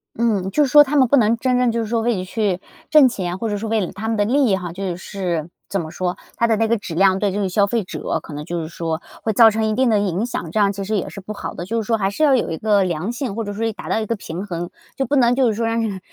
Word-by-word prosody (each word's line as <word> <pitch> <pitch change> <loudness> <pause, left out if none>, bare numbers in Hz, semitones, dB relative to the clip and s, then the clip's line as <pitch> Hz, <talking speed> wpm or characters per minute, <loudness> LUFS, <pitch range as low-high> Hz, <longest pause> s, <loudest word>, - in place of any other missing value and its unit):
嗯， 210 -5 0
就 300 - +3
是 270 - -1
说 295 0 +9
他 290 +1 -3
们 265 -3 +5
不 280 - +4
能 225 -2 +4
真 250 +1 +1
正 250 -1 +2
就 230 - -1
是 220 - -3
说 230 0 0
为 235 0 +1
了 185 - -3
去 195 -2 -1 0.3
挣 300 -4 +7
钱， 185 -5 -4
或 225 - -2
者 205 - -1
是 210 - -5
为 220 0 +1
了 180 - -3
他 220 +3 -6
们 225 - 0
的 205 - +2
利 270 +5 +3
益 205 -6 +3
哈， 180 -2 -5
就 185 0 -4
是， 175 -3 -4 0.2
怎 195 -2 -1
么 160 - -7
说， 180 +2 -2 0.2
它 235 - +1
的 230 -1 +3
那 225 +1 +2
个 230 +1 +2
质 200 -4 -7
量 190 +2 +4
对 200 0 0
这 200 - -2
个 195 -2 0
消 200 +2 +3
费 220 +2 -1
者 185 - -3
可 - - -12
能 150 +1 -6
就 170 0 -3
是 155 - -5
说 165 0 -4 0.2
会 220 - 0
造 225 +1 +7
成 220 +1 -1
一 215 - 0
定 255 +2 +2
的 220 - +3
影 200 -1 0
响。 170 -9 -5
这 215 - 0
样 200 -1 +4
其 200 0 -5
实 210 +2 -1
也 190 - -3
是 - - -9
不 200 +2 -7
好 - - -6
的， 175 - -5
就 225 +4 -1
是 215 - -8
说 225 - +2
还 195 -1 0
是 255 - -6
要 285 -3 +5
有 245 - 0
一 160 - -3
个 205 -1 +2
良 180 +4 -2
性， 245 -4 -4
或 230 - -2
者 205 -1 -5
说 225 +2 -2
一 225 - -1
达 - - -9
到 - - +1
一 - - -2
个 230 - -1
平 185 -2 -6
衡， 175 -3 -4 0.3
就 270 - -1
不 285 - +1
能， 245 -3 +4
就 260 0 +3
是 220 - 0
说 230 +2 -1
让 225 0 0
让 205 -4 -3
210 Hz, 360 characters per minute, -20 LUFS, 185-230 Hz, 0.3 s, 说